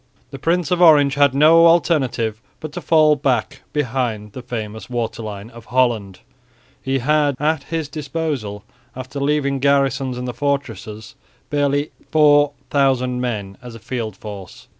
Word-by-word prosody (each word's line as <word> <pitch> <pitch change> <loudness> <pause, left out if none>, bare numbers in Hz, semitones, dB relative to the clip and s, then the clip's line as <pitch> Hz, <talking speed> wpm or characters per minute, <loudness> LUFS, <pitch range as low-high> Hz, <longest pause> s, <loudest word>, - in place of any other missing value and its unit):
The 135 - -8
Prince 170 +1 0
of 180 0 +1
Orange 145 -5 +6
had 140 -2 +3
no 165 +3 +6
alternative 130 -10 +1 0.2
but 155 - -7
to - - -6
fall 155 -2 +4
back 130 -5 -1
behind 120 -7 -2
the 130 - -8
famous 110 -3 -6
waterline 110 -3 -5
of 115 -1 -13
Holland. 120 -7 0 0.6
He 135 0 -1
had 145 +2 +1
at 150 -1 0
his 160 -2 -3
disposal, 145 - -4 0.3
after 130 +2 -7
leaving 140 -1 0
garrisons 135 -2 +1
in 125 - -5
the 125 - -4
fortresses, 115 -6 -4 0.4
barely 145 0 0 0.2
4000 140 -4 +2
men 105 -6 -4
as 120 -2 -10
a - - -10
field 115 -3 -5
force. 100 -4 -10
135 Hz, 140 wpm, -20 LUFS, 115-145 Hz, 0.6 s, Orange